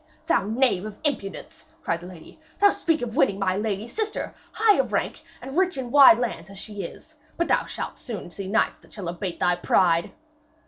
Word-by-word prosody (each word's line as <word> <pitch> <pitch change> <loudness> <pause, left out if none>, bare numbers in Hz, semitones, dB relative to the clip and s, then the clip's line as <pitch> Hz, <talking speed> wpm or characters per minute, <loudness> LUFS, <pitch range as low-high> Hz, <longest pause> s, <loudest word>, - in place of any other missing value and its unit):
'Thou - - +2
knave 225 -4 +2
of 215 -1 -7
impudence!' 240 -10 -3 0.2
cried 165 0 -1
the 175 - -9
lady. 180 - -13 0.2
'Thee 405 - +7
to - - +4
speak 325 -2 0
of 225 -2 -4
winning 195 - +3
my 190 -2 0
lady 210 +1 -2
sister, 430 - -3 0.2
high 440 -1 +4
of - - 0
rank - - -1 0.2
and 270 +1 -7
rich 370 -2 +2
in 250 -2 -4
wide 290 +4 +9
lands 225 -8 -3
as 195 - -11
she 205 0 -6
is! 195 - -9 0.2
But 340 - 0
thou - - +2
shalt - - -6
soon 210 -8 -7
see 195 +1 -6
knights 220 +4 +1
that - - -20
shall 190 -5 -5
abate 180 0 -5
thy 180 0 +2
pride.' 170 -1 +2
210 Hz, 210 wpm, -25 LUFS, 185-275 Hz, 0.2 s, wide